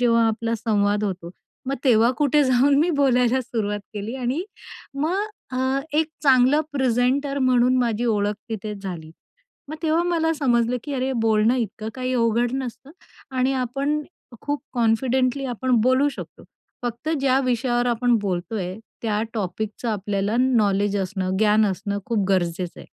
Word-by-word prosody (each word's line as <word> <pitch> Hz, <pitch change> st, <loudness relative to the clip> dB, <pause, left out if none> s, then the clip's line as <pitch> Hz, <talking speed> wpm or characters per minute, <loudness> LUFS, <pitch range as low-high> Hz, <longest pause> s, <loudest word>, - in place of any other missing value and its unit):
जेव्हा 230 Hz, -1 st, +4 dB
आपला 230 Hz, +1 st, -1 dB
संवाद 205 Hz, -2 st, +1 dB
होतो, 180 Hz, -4 st, -4 dB, 0.4 s
मग 270 Hz, -, 0 dB
तेव्हा 235 Hz, -2 st, +5 dB
कुठे 295 Hz, 0 st, +3 dB
जाऊन 260 Hz, +2 st, +4 dB
मी 345 Hz, +3 st, +2 dB
बोलायला 255 Hz, -2 st, +3 dB
सुरुवात 215 Hz, -4 st, -3 dB
केली 210 Hz, +3 st, -4 dB
आणि 260 Hz, +5 st, -1 dB, 0.5 s
मग 335 Hz, +9 st, 0 dB, 0.3 s
अ, 260 Hz, +1 st, 0 dB, 0.2 s
एक 315 Hz, +1 st, +3 dB, 0.2 s
चांगलं 265 Hz, +1 st, +5 dB
प्रेझेंटर 265 Hz, +2 st, +1 dB
म्हणून 255 Hz, -1 st, +3 dB
माझी 235 Hz, -1 st, 0 dB
ओळख 205 Hz, -2 st, +1 dB, 0.2 s
तिथे 215 Hz, -1 st, -4 dB
झाली, 180 Hz, -6 st, -7 dB, 0.6 s
मग 310 Hz, -, -6 dB
तेव्हा 320 Hz, +1 st, +2 dB
मला 330 Hz, -2 st, +1 dB
समजलं 245 Hz, -4 st, +1 dB
की 290 Hz, -, -5 dB
अरे, 265 Hz, 0 st, -1 dB
बोलणं 225 Hz, 0 st, +2 dB
इतकं 220 Hz, -2 st, -3 dB
काही 255 Hz, 0 st, -3 dB
अवघड 235 Hz, 0 st, +1 dB
नसतं 255 Hz, +1 st, -6 dB, 0.5 s
आणि 255 Hz, +1 st, +2 dB
आपण 275 Hz, +4 st, -1 dB, 0.4 s
खूप 290 Hz, 0 st, -2 dB
कॉन्फिडेंटली 255 Hz, +3 st, +1 dB
आपण 255 Hz, +1 st, -3 dB
बोलू 260 Hz, +4 st, +3 dB
शकतो. 285 Hz, -, -9 dB, 0.4 s
फक्त 240 Hz, +4 st, -4 dB
ज्या 265 Hz, -1 st, +3 dB
विषयावर 240 Hz, 0 st, 0 dB
आपण 240 Hz, 0 st, +2 dB
बोलतोय, 185 Hz, 0 st, -3 dB, 0.2 s
त्या 215 Hz, -2 st, 0 dB
टॉपिकच 215 Hz, +3 st, -4 dB
आपल्याला 205 Hz, 0 st, -1 dB
नॉलेज 205 Hz, -5 st, +2 dB
असणं, 190 Hz, -1 st, -2 dB
ज्ञान 215 Hz, 0 st, +4 dB
असणं 200 Hz, +1 st, -2 dB
खूप 220 Hz, -4 st, 0 dB
गरजेचं 180 Hz, -2 st, -1 dB
आहे. -, -, -13 dB
240 Hz, 145 wpm, -23 LUFS, 210-260 Hz, 0.6 s, तेव्हा